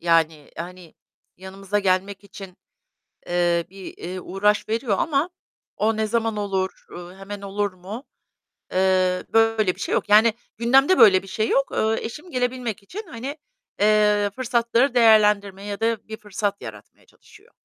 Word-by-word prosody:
Yani, 165 -3 +1
hani, 180 0 -9 0.4
yanımıza 195 +2 -4
gelmek 195 0 0
için, 195 -2 -11 0.7
eee, 175 -1 +1
bir, 190 0 -11
eee, 185 +2 -6
uğraş 200 +4 0
veriyor 225 -1 0
ama 300 +2 0 0.5
o 220 +1 +1
ne 220 0 0
zaman 225 0 -1
olur, 190 -2 -3
ııı, 175 +1 -10
hemen 200 +1 -8
olur 200 0 -2
mu? 195 +7 -8 0.7
Eee, 185 -1 +2
böyle 225 -4 +3
bir - - -18
şey - - -2
yok. - - -1
Yani 215 +2 +6 0.2
gündemde 270 - +4
böyle 190 -2 +7
bir - - -13
şey 215 +3 -1
yok. 275 - +1
Iıı, 220 +1 +1
eşim 300 +10 -7
gelebilmek 245 -4 -2
için, 400 - -8
hani, 270 +2 -6 0.4
eee, 210 -1 +3
fırsatları 240 +1 +1
değerlendirme 210 -4 +4
ya 205 0 -5
da 225 -1 -1
bir 220 - -6
fırsat 205 -1 -3
yaratmaya - - -11
çalışıyor. 435 +2 -21
205 Hz, 150 wpm, -23 LUFS, 190-230 Hz, 0.7 s, böyle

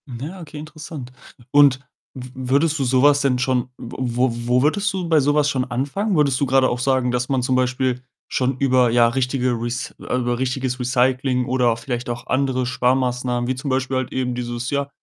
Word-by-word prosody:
Hm, 120 -3 -8
ja, 170 +8 -7
okay, 155 -2 -10
interessant. 155 -3 -8 0.4
Und 145 -2 +5 0.3
w 125 -1 -8 0.2
würdest 155 +2 +2
du - - +1
so 130 0 +2
was 145 0 +5
denn 130 -3 +1
schon 130 -1 0
w 120 - -9 0.2
wo 130 +1 +3 0.2
wo 125 +1 +3
würdest 205 +8 +1
du 185 -3 -3
bei 160 -2 +4
so 145 +1 +2
was 150 -1 +3
schon 130 -2 -1
anfangen? 145 - -2
Würdest 140 -4 +2
du 140 - +2
grade 130 0 +3
auch 120 - -2
sagen, 130 -1 +1
dass 125 0 -1
man 135 -2 +1
zum 130 +1 0
Beispiel 130 0 0 0.3
schon 130 0 -1
über, 130 -3 +3
ja, 120 0 +5
richtige 125 +1 0
Rec 120 +1 -4
äh, - - -3
über 120 -1 -1
richtiges 130 0 -2
Recycling, 125 0 +1
oder 125 -1 +2
auch 115 - -3
vielleicht 120 -2 -4
auch 120 0 -5
andere 130 -1 0
Sparmaßnahmen, 125 -1 0
wie 130 - 0
zum 130 +3 -5
Beispiel 130 0 0
halt 130 -1 -3
eben 125 -1 -1
dieses, 120 0 -4
ja, 140 0 -1
130 Hz, 210 wpm, -21 LUFS, 125-140 Hz, 0.4 s, Und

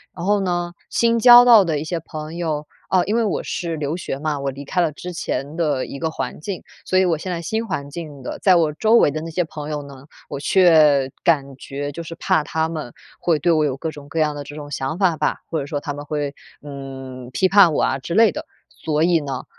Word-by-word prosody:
然 170 - -5
后 205 +1 +3
呢， 175 -2 -2 0.2
新 230 0 +2
交 240 +1 +9
到 230 -4 +8
的 160 -5 -1
一 - - -4
些 170 +2 -3
朋 155 0 -8
友 155 -3 -3 0.2
啊， 185 -2 +3
因 210 +3 -1
为 235 - +2
我 210 - -1
是 170 -2 -3
留 150 +2 -2
学 140 -6 -5
嘛， 150 -1 -2
我 140 0 -2
离 140 +2 -9
开 180 +6 -2
了 165 -3 +2
之 180 +4 -8
前 150 -3 -4
的 150 -6 0
一 - - -7
个 160 +3 -2
环 - - -5
境， 185 +4 -6 0.2
所 185 - +2
以 190 - +4
我 165 -3 +1
现 185 +3 -5
在 170 - -3
新 220 +7 -2
环 140 -8 -4
境 150 -2 -8
的， 125 - -6
在 190 - +5
我 165 -3 +3
周 220 +8 +1
围 190 - +6
的 155 +2 -4
那 165 +1 -6
些 180 +2 0
朋 155 -2 -7
友 150 -1 -3
呢， 140 -1 -12 0.2
我 140 - -5
却 150 -5 +4
感 140 -6 +1
觉 140 +1 -5
就 170 +4 -7
是 165 +1 -8
怕 160 -1 +1
他 160 +2 -1
们 155 -7 -6 0.3
会 165 -3 +1
对 170 +4 +2
我 155 -2 +3
有 135 -3 -1
各 160 +4 -4
种 145 -2 -11
各 160 +3 -3
样 150 -1 +1
的 145 - -6
这 145 +1 -10
种 145 -1 -8
想 140 +4 -3
法 180 -5 +2
吧， 150 - 0
或 160 - -1
者 140 - -4
说 145 0 -3
他 145 -1 -5
们 145 - -8
会， 145 -1 -3 0.3
嗯， 135 -3 -8
批 185 +8 +2
判 195 -4 +6
我 - - +1
啊 130 - +1
之 155 +6 -6
类 220 0 +5
的。 - - -6 0.2
所 155 0 -1
以 170 -1 +3
呢， 135 -3 -5
155 Hz, 275 characters per minute, -21 LUFS, 145-175 Hz, 0.3 s, 交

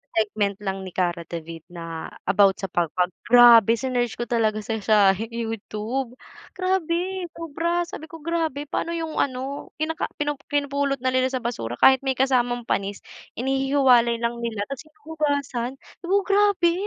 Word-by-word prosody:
segment 210 -2 0
lang 195 -1 -3
ni 190 - -7
Kara 175 -2 0
David 165 -1 -7
na 165 -2 -7 0.2
about 195 0 +4
sa 195 -2 -5
pagpag, 175 +1 0 0.2
grabe 235 -2 +8
sinearch 245 -1 -1
ko - - -3
talaga 220 -2 0
sa 220 +1 -3
siya 215 0 +3
hi 220 +4 -5
YouTube 230 +2 -4 0.4
grabe! 370 0 -1
Sobra, 335 +2 -1
sabi 335 -2 -9
ko 325 -1 -12
grabe 320 -4 -1
paano 330 +3 -3
yung 325 -2 -3
ano, 265 +1 -2
kinaka 320 +3 -2
pinu 295 -2 -2
pinupulot 280 -1 0
na 255 - +2
nila 255 0 +2
sa 255 -2 -4
basura 120 - -3
kahit 265 - +6
may 265 -1 -1
kasamang 245 -2 +1
panis, 200 -3 -2 0.3
inihihiwalay 265 -2 +3
lang 235 0 -2
nila 230 -3 -3
ta's 275 +3 -7
hinuhugasan 290 -5 -3 0.2
'di 350 - -10
ba, 395 - +4
grabe. 395 -4 +3
255 Hz, 155 wpm, -24 LUFS, 215-295 Hz, 0.4 s, grabe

